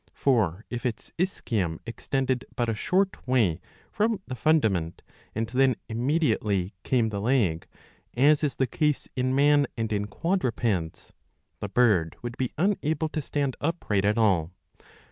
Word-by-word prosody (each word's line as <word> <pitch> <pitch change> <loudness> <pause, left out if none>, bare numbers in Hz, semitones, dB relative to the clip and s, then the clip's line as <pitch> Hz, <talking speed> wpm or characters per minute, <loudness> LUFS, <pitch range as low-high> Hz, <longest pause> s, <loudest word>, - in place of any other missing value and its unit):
For 110 - +1
if 120 -1 -4
its 120 -4 -4
ischium 105 - -1
extended 130 +2 -1
but 120 - 0
a 115 - 0
short 185 - 0
way 105 -10 +2 0.3
from 215 0 +1
the 130 - -6
fundament, 110 - +1 0.3
and 115 +1 0
then 130 +2 +2
immediately 110 - 0
came 120 -4 +1
the 100 -2 -3
leg, 105 -9 +1 0.5
as 145 +4 +4
is 145 -3 0
the 130 - +1
case 150 +2 0
in 130 +1 0
man 145 0 +4
and 110 -1 -1
in 105 0 -1
quadrupeds, 115 - -1 0.5
the 100 - -4
bird 100 -8 +3
would 120 0 -5
be 130 -2 -2
unable 160 -4 0
to 155 - -3
stand 140 -2 -2
upright 145 - 0
at 105 +2 +2
all. 95 -8 +3
120 Hz, 145 wpm, -26 LUFS, 105-145 Hz, 0.5 s, as